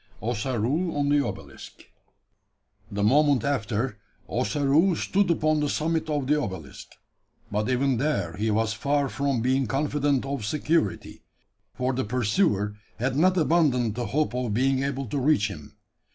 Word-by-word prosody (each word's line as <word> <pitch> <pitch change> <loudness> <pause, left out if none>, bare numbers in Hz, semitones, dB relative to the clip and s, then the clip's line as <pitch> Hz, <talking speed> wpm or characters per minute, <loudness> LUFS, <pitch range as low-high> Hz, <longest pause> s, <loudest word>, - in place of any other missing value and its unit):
OSSAROO 125 - -1
ON 145 -1 +1
THE 145 0 +3
OBELISK. - - -8 1.1
The 100 0 -2
moment 140 +3 +4
after, 120 -4 -1 0.3
Ossaroo 145 - +2
stood 195 +2 +1
upon 155 -2 +2
the 150 -1 0
summit 160 +1 -1
of 145 -3 -1
the 150 +2 +2
obelisk. 90 - -7 0.6
But 105 +2 -1
even 130 0 +1
there 150 -3 -1
he 110 +2 -1
was 110 +1 +1
far 140 +4 0
from 140 -4 -1
being 130 0 +1
confident 140 +1 0
of 135 -4 -3
security: 150 - -1 0.5
for 125 +1 -1
the 130 +1 -1
pursuer 105 - +1 0.2
had 125 +3 -1
not 185 +5 +3
abandoned 150 - +2
the 120 0 -3
hope 135 -1 0
of 125 -4 -2
being 130 +2 +2
able 135 0 -2
to 140 +5 -3
reach 125 -7 +2
him. 75 -7 -11
135 Hz, 150 wpm, -26 LUFS, 110-150 Hz, 1.1 s, moment